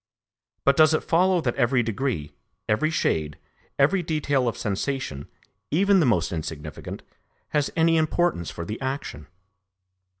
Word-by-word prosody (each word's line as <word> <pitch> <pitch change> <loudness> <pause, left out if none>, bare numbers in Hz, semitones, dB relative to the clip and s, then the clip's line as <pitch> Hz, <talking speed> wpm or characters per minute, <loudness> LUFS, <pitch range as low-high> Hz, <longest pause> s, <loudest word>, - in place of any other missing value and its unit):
But 140 - +5
does 155 0 +5
it - - -1
follow 180 +1 +3
that 120 -5 0
every 125 -1 +2
degree, 110 - -2 0.3
every 130 +9 +2
shade, 75 - -1 0.4
every 165 +7 +3
detail 145 -5 0
of 115 - -2
sensation, 100 - -3 0.4
even 195 +4 +4
the 155 - +3
most 90 -8 +1
insignificant, 75 -3 -6 0.5
has 150 -2 +1
any 165 0 +3
importance 160 - +1
for 85 - -6
the 110 +8 -6
action? 130 - -4
135 Hz, 135 wpm, -25 LUFS, 95-155 Hz, 0.5 s, But